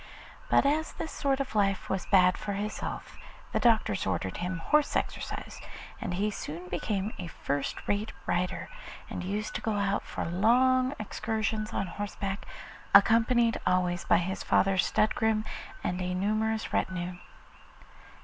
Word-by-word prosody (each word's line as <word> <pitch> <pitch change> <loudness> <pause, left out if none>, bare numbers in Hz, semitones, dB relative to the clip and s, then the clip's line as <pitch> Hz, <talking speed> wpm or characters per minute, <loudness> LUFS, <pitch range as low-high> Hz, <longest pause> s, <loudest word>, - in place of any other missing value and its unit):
But - - +5
as 305 +3 +1
this 320 - -5
sort 275 -1 0
of 270 -3 -3
life 195 -2 +1
was 190 -1 -2
bad 185 -1 +5
for 205 - -4
his 210 +2 -3
health, - - -5 0.4
the - - +1
doctors 220 - +3
ordered 95 0 -1
him 185 +1 -2
horse 295 - +2
exercise, - - -3 0.4
and 175 - -2
he 210 +3 0
soon 175 -1 -6
became 205 +2 -2
a 180 - -4
first 140 -3 -3
rate 205 +2 0
rider, 180 +1 -1 0.4
and - - -4
used 210 +3 -3
to - - -3
go 220 - -1
out 200 0 +1
for - - -5
long 255 +9 +3
excursions 215 0 -2
on 195 - -1
horseback, 200 +1 -4 0.5
accompanied 230 +3 +5
always 180 -1 +1
by - - +4
his 180 +2 -2
father's 195 -1 +3
stud 215 - +2
groom 220 -1 +1 0.4
and 180 +1 -1
a 180 0 -1
numerous 215 +3 0
retinue. 180 -1 -1
205 Hz, 150 wpm, -29 LUFS, 180-220 Hz, 0.5 s, But